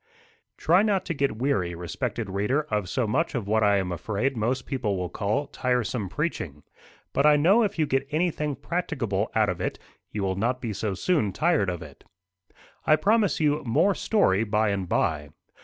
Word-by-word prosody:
Try 175 +4 +4
not 200 -3 +1
to 165 - -2
get 140 -6 -1
weary, 100 -10 0
respected 110 - -4
reader, 105 +10 0
of 105 -4 0
so 125 +2 0
much 145 +9 0
of 120 -5 -2
what 110 +1 +2
I 100 -1 +4
am 95 -2 -1
afraid 110 +9 -2
most 120 +3 -1
people 115 -8 -2
will 90 -1 -3
call 110 +9 -1
tiresome 125 -6 -1
preaching. 85 - -3 0.5
But 140 +2 +3
I 150 - +7
know 180 +10 +4
if 210 -5 0
you 155 - +2
get 135 -1 0
anything 150 -2 -1
practicable 120 - -2
out 110 -1 +3
of 90 - -3
it, - - -2 0.3
you 105 - -3
will 95 -1 0
not 125 +5 0
be 115 -4 -4
so 100 -1 -2
soon 145 - +1
tired 155 - +2
of 90 -3 -4
it. 70 -3 -14 0.8
I 155 - +5
promise 210 +4 +2
you 150 -1 +2
more 170 - +3
story 115 - +2
by 110 0 +1
and 95 -3 -2
by. 75 -2 0
120 Hz, 190 wpm, -26 LUFS, 100-150 Hz, 0.8 s, I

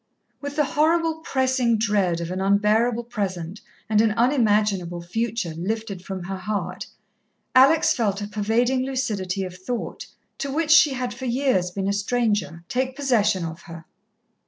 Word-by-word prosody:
With 285 0 -5
the 300 - +3
horrible, 320 +2 +1
pressing 260 -6 +1
dread 200 -6 +1
of 170 +1 -4
an 185 +1 -3
unbearable 215 +4 +2
present 195 -5 -4 0.3
and 215 -1 +3
an 220 -1 +2
unimaginable 210 -8 +1
future 225 -1 -2
lifted 200 +2 -4
from 190 -2 -6
her 190 +2 -5
heart, 205 +2 -4 0.7
Alex 275 +5 +5
felt 205 -5 0
a 205 - -4
pervading 230 +5 +1
lucidity 210 -8 -2
of 180 -1 -6
thought, 220 +6 -5 0.3
to 280 - -3
which 315 +2 0
she 300 -2 +7
had 250 -1 -3
for 260 +2 -7
years 245 -7 +1
been 195 +2 -3
a 200 - +1
stranger, 205 -6 -1
take 260 +3 -1
possession 215 -10 +1
of 165 +2 -7
her. 165 -1 -9
215 Hz, 155 wpm, -23 LUFS, 190-255 Hz, 0.7 s, she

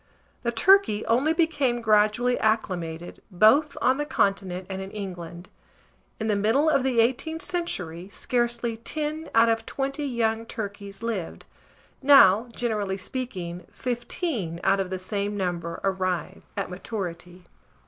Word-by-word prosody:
The 235 - -1
turkey 240 - +4
only 260 +7 +2
became 290 -7 +1
gradually 220 +2 +3
acclimated, 175 -6 -2
both 220 - +4
on 260 +2 +3
the 295 - 0
continent 190 -5 0
and 190 -1 -5
in 190 - -6
England: 180 -3 -7 0.7
in 220 - -2
the 215 -2 +1
middle 230 +10 +3
of 275 - +3
the 260 -2 0
18th 265 +8 +1
century, 185 - -3
scarcely 240 0 -1
10 305 +6 -4
out 230 +1 +6
of 225 0 +1
20 275 +2 -2
young 230 -4 -1
turkeys 200 -1 -6
lived; 215 -7 -4 0.6
now, 250 -6 +7
generally 210 -5 -2
speaking, 185 -5 -5
15 240 - -3
out 195 0 +3
of 190 -1 -1
the 185 - -3
same 200 +2 -3
number 170 -3 -3
arrive 185 -2 -1 0.2
at 195 -2 -3
maturity. 180 -2 -6
220 Hz, 135 wpm, -26 LUFS, 190-250 Hz, 0.7 s, now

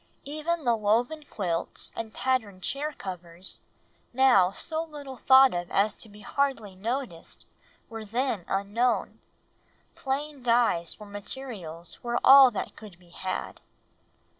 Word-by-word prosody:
Even 310 +3 -2
the 240 -3 +3
woven 235 +8 0
quilts 175 -9 -3
and 225 -1 -5
patterned 215 -9 -1
chair 290 - -2
covers, 180 - -7 0.5
now 245 -8 +5
so 315 - -3
little 290 -5 -9
thought 265 +1 +6
of 175 0 -3
as 205 +2 +2
to 220 - -12
be 205 +1 -14
hardly 260 -4 -1
noticed, 230 -3 -5 0.4
were 225 -1 -7
then 230 -2 -1
unknown; 205 +6 0 0.7
plain 280 +1 -3
dyes 230 -9 +2
for 210 - -11
materials 200 -6 -8
were 240 0 0
all 270 -1 +10
that 215 - -5
could 210 -5 -12
be 175 -1 -22
had. 185 +1 -5
230 Hz, 130 wpm, -27 LUFS, 195-265 Hz, 0.7 s, all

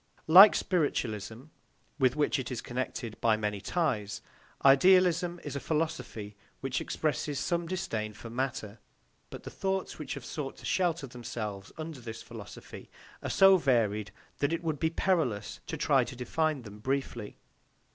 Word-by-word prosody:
Like 190 +6 +10
spiritualism, 120 - -1 0.6
with 130 -1 +3
which 150 -1 +1
it 130 - -4
is 125 - -3
connected 120 -2 -5
by 110 -2 +3
many 105 -2 -2
ties, 120 - -1 0.4
idealism 175 +4 +5
is 145 -2 -5
a - - -1
philosophy 130 -10 -3 0.2
which 135 -1 -2
expresses 150 -1 -2
some 170 -1 -1
disdain 110 -12 -3
for 115 - -10
matter, 120 -4 -3 0.5
but - - -9
the - - -8
thoughts 190 -3 -2
which 150 - -4
have 135 -4 -8
sought 140 0 -5
to - - -11
shelter 170 -5 +1
themselves 110 -6 -6
under 155 -3 -6
this 115 -1 -7
philosophy 115 -2 -10 0.3
are - - -4
so 195 0 +7
varied 110 - +1 0.3
that 145 +2 +1
it 165 +1 -2
would 155 -3 -2
be 160 - +2
perilous 160 - 0
to 160 - -4
try 140 -3 +3
to 130 - -8
define 145 +3 -1
them 105 -1 -11
briefly. 130 -3 -3
135 Hz, 155 wpm, -30 LUFS, 115-160 Hz, 0.6 s, Like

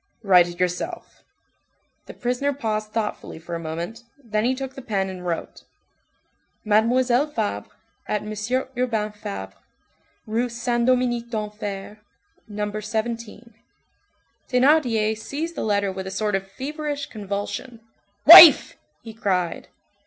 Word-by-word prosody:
Write 180 -3 +5
it 175 0 -10
yourself." 180 - -4 0.8
The - - -10
prisoner 250 +4 -1
paused 215 -5 -3
thoughtfully 215 -6 -4
for 170 +1 -9
a 170 - -3
moment, 170 +8 -6 0.2
then 215 -1 -1
he 255 +2 +1
took 265 0 -6
the 270 - -9
pen 195 -5 -2
and 185 -1 -8
wrote:— 170 -1 -4 1.0
"Mademoiselle 240 +5 +2
Fabre, 100 - -3 0.4
at 210 - -2
M. 210 - -7 0.4
Urbain 225 -4 -1
Fabre's, 95 - -7 0.7
Rue 230 +3 -1
Saint 240 0 -1
Dominique 245 -2 +1
D'Enfer, 210 -2 -6 0.5
No. 210 0 -4
17." 225 +1 -5 1.0
Thénardier 250 -5 +3
seized 300 +9 -5
the - - -5
letter 200 -2 0
with 190 0 -6
a - - -3
sort 210 +2 -2
of 195 0 -2
feverish 290 +3 -4
convulsion. 210 +3 -6 0.5
"Wife!" 330 0 +10 0.3
he 225 - -9
cried. 185 -5 -2
220 Hz, 125 wpm, -23 LUFS, 200-250 Hz, 1.0 s, Wife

